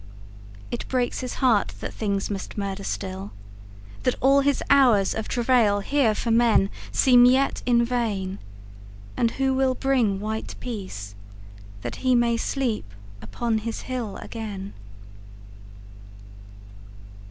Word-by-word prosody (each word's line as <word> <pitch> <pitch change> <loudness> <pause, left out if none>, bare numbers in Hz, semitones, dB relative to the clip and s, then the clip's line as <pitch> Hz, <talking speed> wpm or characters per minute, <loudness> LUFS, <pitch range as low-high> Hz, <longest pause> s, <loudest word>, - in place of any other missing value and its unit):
It - - -4
breaks 250 -2 -1
his 255 -1 -5
heart 225 -5 +2
that - - -6
things 200 -2 -2
must 195 +1 -6
murder 200 -1 -3
still, 100 - -4 0.7
That - - +1
all 275 +2 +4
his 285 0 +1
hours 245 -9 +4
of 220 - -4
travail 235 -5 +2
here 250 -2 +2
for 230 - -2
menSeem 240 +2 +4
yet 270 +2 +1
in 235 -1 +4
vain. 210 -6 -2 0.8
And 235 - +2
who 265 +2 0
will 260 -1 +1
bring 245 -9 +1
white 220 +2 -4
peaceThat 100 - -9
he 255 -1 +2
may 235 -1 +3
sleep 230 - -2 0.3
upon 220 - -2
his 225 +1 -5
hill 245 -6 -4
again? 205 -4 -7
225 Hz, 120 wpm, -24 LUFS, 195-250 Hz, 0.8 s, all